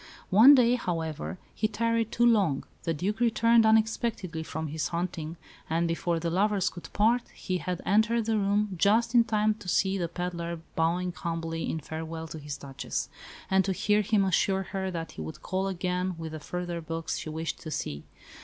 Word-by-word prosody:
One 235 +9 +9
day, 245 -2 +5
however, 160 - -3 0.2
he 215 - 0
tarried 230 +1 0
too 240 - +3
long; 200 - +3 0.2
the 165 - +1
Duke 200 +8 -2
returned 230 -1 +4
unexpectedly 220 -5 +1
from 160 -1 -4
his 155 +1 -2
hunting, 170 -2 -3 0.3
and 165 +1 +1
before 170 0 -1
the 165 0 -2
lovers 195 +1 +2
could 175 - -10
part, 230 +4 +2
he 185 -1 -2
had 180 +2 -4
entered 220 +3 +3
the 220 -1 +1
room 205 0 +1
just 220 +6 +3
in 240 -1 +7
time 215 -1 +2
to 210 -3 -13
see 190 +2 +2
the 170 - 0
pedlar 170 -1 -4 0.2
bowing 175 +2 +1
humbly 165 -1 -3
in 160 - -2
farewell 160 +2 -6
to 160 - -7
his 145 -1 -6
Duchess, 140 0 -4 0.4
and 190 0 +5
to 195 - 0
hear 210 +3 +2
him 205 -1 +2
assure 190 +1 +2
her 190 0 -3
that 165 -2 -5
he - - -8
would 80 0 -7
call 190 +1 -1
again 180 0 -1
with 160 -1 -6
the 155 - -6
further 175 +2 -4
books 165 0 -3
she - - -6
wished 160 +1 -4
to 160 - -7
see. 75 - -4
180 Hz, 190 wpm, -28 LUFS, 165-210 Hz, 0.4 s, One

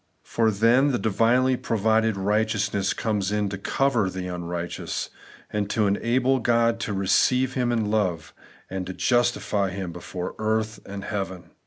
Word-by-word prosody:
For 115 -1 +1
then 115 +7 +3
the 125 - +1
divinely 120 +4 +2
provided 110 -2 +1
righteousness 105 0 0
comes 105 -3 -1
in 105 -1 0
to 100 - -4
cover 120 -3 +1
the 95 0 -5
xmrighteous, 85 -1 -4 0.4
and 105 -1 -1
to 110 0 +1
enable 125 +6 +2
God 115 -1 +2
to 115 - -3
receive 110 +7 +2
him 125 -2 0
in 110 -3 0
love, 90 -7 -1 0.3
and 95 0 -5
justify 120 -5 +1
him 95 -1 -5
before 90 +1 -6
earth 110 0 -1
and 100 0 -6
heaven. 95 -4 -5
105 Hz, 145 wpm, -25 LUFS, 95-115 Hz, 0.4 s, then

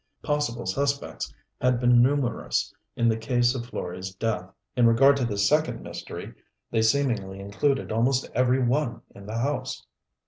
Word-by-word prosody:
Possible 145 -6 -1
suspects 140 0 -2 0.3
had 125 -1 +2
been 120 -1 +5
numerous 130 -1 0 0.2
in 120 - +2
the 110 - +3
case 120 +1 +2
of 120 -2 -5
Florey's 95 -2 -5
death: 95 -3 -2 0.3
in 120 -2 +5
regard 135 +5 +6
to 130 - 0
this 100 -3 +1
second 155 +1 +1
mystery - - -7 0.4
they 115 - +2
seemingly 110 -6 +1
included 105 +9 -1
almost 125 +4 +1
every 125 +1 +2
one 125 0 0
in 100 0 -12
the 110 +1 -4
house. 130 +1 -2
120 Hz, 150 wpm, -26 LUFS, 110-135 Hz, 0.4 s, regard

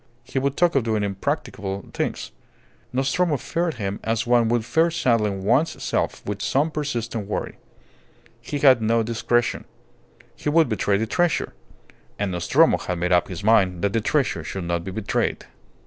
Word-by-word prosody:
He 130 - -2
would 140 +1 -1
talk 175 -1 +3
of 135 - +3
doing 110 -2 0
impracticable 100 0 -3
things. - - -3 0.6
Nostromo 140 +5 +1
feared 170 +4 -2
him 100 -3 -4
as 115 +1 0
one 120 -1 +3
would 120 -2 +1
fear 160 +8 +3
saddling 115 - 0
one's 125 +11 +1
self - - -2
with 105 0 -4
some 150 +4 +1
persistent 120 -8 -3
worry. 105 - -4 0.8
He 145 - -4
had 130 -4 +5
no 115 +1 +2
discretion. 120 +1 0 0.7
He - - -3
would 160 -2 +4
betray 105 -2 +1
the 110 - 0
treasure. 175 +8 0 0.6
And 100 -2 -1
Nostromo 85 -1 +3
had 90 - -3
made 90 +1 -1
up 90 -1 +3
his 95 0 -7
mind 95 -5 +3
that 100 -1 +1
the 115 - +1
treasure 125 - 0
should 95 +4 -5
not 85 0 -2
be 95 - -6
betrayed. 100 +2 -2
115 Hz, 165 wpm, -23 LUFS, 100-135 Hz, 0.8 s, had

